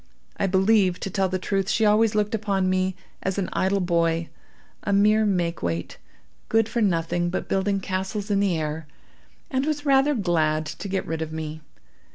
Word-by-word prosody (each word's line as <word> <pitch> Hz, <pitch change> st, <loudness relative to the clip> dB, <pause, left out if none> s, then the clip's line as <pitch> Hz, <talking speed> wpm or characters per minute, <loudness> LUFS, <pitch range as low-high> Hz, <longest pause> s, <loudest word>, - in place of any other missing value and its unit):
I 195 Hz, -, +1 dB
believe, 190 Hz, -1 st, +3 dB
to 195 Hz, -, -4 dB
tell 190 Hz, 0 st, +1 dB
the 185 Hz, -, -1 dB
truth, 195 Hz, +1 st, -1 dB
she 220 Hz, 0 st, +2 dB
always 215 Hz, +1 st, +4 dB
looked 210 Hz, +1 st, +1 dB
upon 200 Hz, -3 st, 0 dB
me 185 Hz, 0 st, 0 dB, 0.3 s
as 190 Hz, 0 st, -2 dB
an 195 Hz, -, -1 dB
idle 195 Hz, +1 st, +1 dB
boy, 170 Hz, -2 st, +1 dB, 0.5 s
a 205 Hz, -, -2 dB
mere 210 Hz, +2 st, +4 dB
make 175 Hz, -4 st, 0 dB
weight, 85 Hz, -1 st, -3 dB, 0.5 s
good 225 Hz, -1 st, +3 dB
for 230 Hz, +1 st, -1 dB
nothing 175 Hz, -3 st, +1 dB
but 180 Hz, -, -3 dB
building 195 Hz, +1 st, 0 dB
castles 190 Hz, +2 st, -3 dB
in 200 Hz, -, +3 dB
the 195 Hz, -4 st, +1 dB
air, 155 Hz, 0 st, -4 dB, 0.6 s
and 260 Hz, -1 st, +1 dB
was 295 Hz, 0 st, -2 dB
rather 280 Hz, +1 st, +4 dB
glad 160 Hz, -6 st, +1 dB
to 155 Hz, +6 st, -6 dB
get 190 Hz, 0 st, -1 dB
rid 160 Hz, 0 st, -3 dB
of 160 Hz, -1 st, -3 dB
me. 155 Hz, 0 st, -5 dB
190 Hz, 185 wpm, -24 LUFS, 170-210 Hz, 0.6 s, always